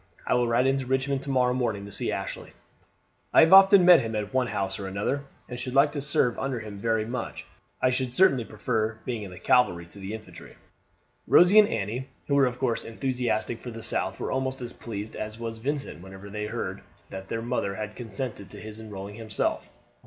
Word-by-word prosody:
I -, -, +1 dB
will 120 Hz, -1 st, +2 dB
ride 120 Hz, +2 st, +2 dB
into 135 Hz, -1 st, +1 dB
Richmond 135 Hz, +1 st, 0 dB
to 140 Hz, -, -7 dB
morrow 125 Hz, -2 st, +2 dB
morning 115 Hz, -6 st, -1 dB
and 100 Hz, -1 st, -9 dB
see -, -, -1 dB
Ashley. -, -, -5 dB, 0.8 s
I -, -, +7 dB
have 160 Hz, +3 st, +6 dB
often 195 Hz, -1 st, +8 dB
met 180 Hz, -2 st, +8 dB
him 115 Hz, -1 st, -4 dB
at 105 Hz, +1 st, -3 dB
one 130 Hz, -1 st, +2 dB
house 95 Hz, -3 st, -2 dB
or 95 Hz, -, -5 dB
another, 105 Hz, +9 st, -2 dB, 0.2 s
and 125 Hz, -1 st, -6 dB
should 125 Hz, +1 st, -4 dB
like 140 Hz, +2 st, +5 dB
to 145 Hz, -, -4 dB
serve 135 Hz, -4 st, +1 dB
under 135 Hz, -3 st, -2 dB
him 105 Hz, -3 st, -8 dB
very 110 Hz, 0 st, 0 dB
much. 125 Hz, +3 st, -5 dB, 0.4 s
I 130 Hz, -, +4 dB
should 125 Hz, -1 st, -1 dB
certainly 135 Hz, -4 st, +4 dB
prefer 110 Hz, 0 st, -2 dB
being 120 Hz, -3 st, -3 dB
in 100 Hz, -, -7 dB
the 90 Hz, -, -11 dB
cavalry 90 Hz, -9 st, +2 dB
to 95 Hz, +4 st, -11 dB
the 100 Hz, +3 st, -5 dB
infantry." 110 Hz, -1 st, -12 dB, 0.7 s
Rosie 180 Hz, +5 st, +7 dB
and 210 Hz, -, +7 dB
Annie, 115 Hz, +5 st, -3 dB, 0.2 s
who 140 Hz, -, -1 dB
were 140 Hz, -2 st, +5 dB
of 125 Hz, 0 st, -4 dB
course 120 Hz, -3 st, 0 dB
enthusiastic 120 Hz, -1 st, -2 dB
for 125 Hz, -, -8 dB
the 115 Hz, -1 st, -8 dB
South, -, -, 0 dB
were -, -, -3 dB
almost 130 Hz, 0 st, -1 dB
as 120 Hz, -1 st, -7 dB
pleased 105 Hz, -2 st, -7 dB
as 110 Hz, 0 st, -5 dB
was 115 Hz, -1 st, -5 dB
Vincent 140 Hz, -, -3 dB
when 95 Hz, +2 st, -11 dB
they 105 Hz, 0 st, -3 dB
heard -, -, -4 dB, 0.3 s
that 95 Hz, 0 st, -7 dB
their 115 Hz, +2 st, -3 dB
mother 115 Hz, -5 st, -2 dB
had 105 Hz, 0 st, -5 dB
consented 110 Hz, -3 st, -5 dB
to -, -, -9 dB
his 110 Hz, 0 st, -9 dB
enrolling 105 Hz, -2 st, -8 dB
himself. 110 Hz, -2 st, -2 dB
115 Hz, 210 wpm, -27 LUFS, 105-130 Hz, 0.8 s, often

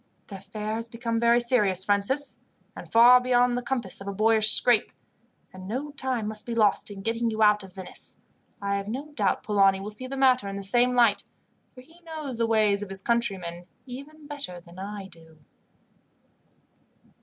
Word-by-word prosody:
"The 195 Hz, -, -7 dB
affair 215 Hz, +3 st, -5 dB
has 230 Hz, 0 st, -6 dB
become 230 Hz, 0 st, -3 dB
very 235 Hz, +1 st, +4 dB
serious, 210 Hz, -7 st, +2 dB
Francis, 205 Hz, +8 st, -1 dB, 0.4 s
and -, -, -11 dB
far 245 Hz, +2 st, +7 dB
beyond 245 Hz, -1 st, +2 dB
the 245 Hz, -, -2 dB
compass 240 Hz, -7 st, -3 dB
of 195 Hz, -, -9 dB
a -, -, -2 dB
boyish 215 Hz, +1 st, +4 dB
scrape, 240 Hz, -1 st, +5 dB, 0.6 s
and 185 Hz, 0 st, -10 dB
no 265 Hz, +8 st, -4 dB
time 260 Hz, -6 st, -2 dB
must 215 Hz, +1 st, -3 dB
be 235 Hz, -, -3 dB
lost 215 Hz, -2 st, +2 dB
in 195 Hz, -1 st, -9 dB
getting 230 Hz, +1 st, -1 dB
you 220 Hz, 0 st, 0 dB
out 210 Hz, -1 st, +4 dB
of 190 Hz, -2 st, -14 dB
Venice. 190 Hz, -2 st, -7 dB, 0.5 s
I 200 Hz, 0 st, 0 dB
have 200 Hz, 0 st, -5 dB
no 270 Hz, +7 st, -6 dB
doubt 205 Hz, -9 st, -1 dB
Polani 195 Hz, -2 st, +3 dB
will 200 Hz, +2 st, -6 dB
see 255 Hz, +5 st, -6 dB
the 270 Hz, +1 st, -6 dB
matter 255 Hz, -5 st, +3 dB
in 195 Hz, -, -5 dB
the 200 Hz, -, -4 dB
same 240 Hz, +5 st, +3 dB
light, 235 Hz, -4 st, +3 dB, 0.5 s
for 255 Hz, -, -12 dB
he 325 Hz, +7 st, -21 dB
knows 310 Hz, -7 st, -7 dB
the 230 Hz, -, +1 dB
ways 215 Hz, -3 st, +2 dB
of 205 Hz, -, -6 dB
his 195 Hz, 0 st, -7 dB
countrymen 190 Hz, -7 st, -2 dB, 0.2 s
even 280 Hz, +4 st, -11 dB
better 280 Hz, -12 st, -6 dB
than 175 Hz, +1 st, -15 dB
I 200 Hz, 0 st, -7 dB
do." 165 Hz, -3 st, -19 dB
220 Hz, 190 wpm, -26 LUFS, 200-250 Hz, 0.6 s, far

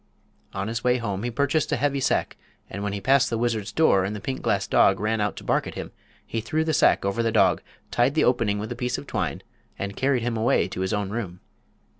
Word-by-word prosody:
On 95 Hz, +1 st, -2 dB
his 115 Hz, +1 st, -3 dB
way 125 Hz, 0 st, +3 dB
home 100 Hz, -5 st, -3 dB
he 120 Hz, -, -2 dB
purchased 140 Hz, +5 st, 0 dB
a -, -, +3 dB
heavy 140 Hz, -1 st, 0 dB
sack, 135 Hz, -, 0 dB, 0.4 s
and 100 Hz, -, -5 dB
when 100 Hz, 0 st, -2 dB
he 100 Hz, -, -3 dB
passed 135 Hz, +4 st, +3 dB
the 115 Hz, -, -1 dB
wizard's 110 Hz, -3 st, -1 dB
door 105 Hz, -7 st, +3 dB
and 100 Hz, +3 st, -3 dB
the -, -, -5 dB
pink 130 Hz, +5 st, -4 dB
glass 100 Hz, -1 st, 0 dB
dog 95 Hz, 0 st, +4 dB
ran 110 Hz, +1 st, 0 dB
out 105 Hz, -1 st, -1 dB
to -, -, -9 dB
bark -, -, 0 dB
at -, -, -7 dB
him -, -, -6 dB, 0.3 s
he 115 Hz, -, -3 dB
threw 155 Hz, +8 st, -1 dB
the 160 Hz, 0 st, -1 dB
sack -, -, +3 dB
over 100 Hz, +4 st, 0 dB
the 115 Hz, -1 st, +1 dB
dog, 100 Hz, -5 st, +3 dB, 0.3 s
tied 125 Hz, +4 st, +2 dB
the 160 Hz, -, +3 dB
opening 115 Hz, -5 st, +2 dB
with 105 Hz, +2 st, -5 dB
a -, -, -3 dB
piece 125 Hz, 0 st, -2 dB
of -, -, -8 dB
twine, -, -, -3 dB, 0.3 s
and 100 Hz, 0 st, -4 dB
carried 130 Hz, -3 st, +1 dB
him 120 Hz, -1 st, -1 dB
away 110 Hz, +2 st, +2 dB
to -, -, -5 dB
his 95 Hz, -, -1 dB
own 105 Hz, -2 st, -1 dB
room. 100 Hz, -6 st, -4 dB
115 Hz, 250 wpm, -25 LUFS, 100-125 Hz, 0.4 s, dog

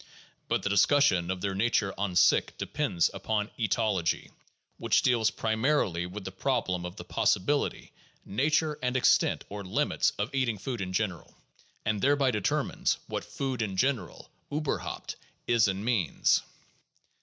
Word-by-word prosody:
But -, -, 0 dB
the -, -, 0 dB
discussion 100 Hz, -4 st, +3 dB
of 95 Hz, -1 st, -2 dB
their 100 Hz, 0 st, -1 dB
nature 100 Hz, -1 st, +1 dB
an 100 Hz, -3 st, -2 dB
sich -, -, +4 dB
depends 85 Hz, -2 st, 0 dB
upon 105 Hz, -1 st, -2 dB
' -, -, -32 dB
' -, -, -22 dB
eatology, 105 Hz, -6 st, 0 dB
' -, -, -37 dB
' -, -, -47 dB
which -, -, +2 dB
deals 120 Hz, -3 st, +3 dB
primarily 110 Hz, -, 0 dB
with 95 Hz, +2 st, -8 dB
the 95 Hz, -, -5 dB
problem 95 Hz, -5 st, -1 dB
of 90 Hz, -, -10 dB
the -, -, -8 dB
possibility, 145 Hz, +10 st, 0 dB, 0.3 s
nature, 150 Hz, +7 st, +1 dB
and 125 Hz, 0 st, 0 dB
extent 125 Hz, -, +3 dB
(or 100 Hz, 0 st, -6 dB
limits) 95 Hz, -, +1 dB
of 105 Hz, +6 st, -3 dB
eating 130 Hz, -5 st, 0 dB
food 120 Hz, +2 st, -4 dB
in 90 Hz, -1 st, -3 dB
general, 95 Hz, -4 st, -3 dB, 0.5 s
and 110 Hz, -2 st, 0 dB
thereby 140 Hz, -1 st, +3 dB
determines 105 Hz, -4 st, 0 dB
what -, -, -4 dB
food 130 Hz, -4 st, -3 dB
in 95 Hz, -4 st, -2 dB
gen 130 Hz, +4 st, +3 dB
eral, 90 Hz, -5 st, -11 dB, 0.3 s
uberhaupt, 150 Hz, 0 st, -3 dB, 0.3 s
is 115 Hz, -2 st, +4 dB
and 100 Hz, +2 st, -2 dB
means. 110 Hz, -, +2 dB
105 Hz, 160 wpm, -29 LUFS, 95-130 Hz, 0.5 s, sich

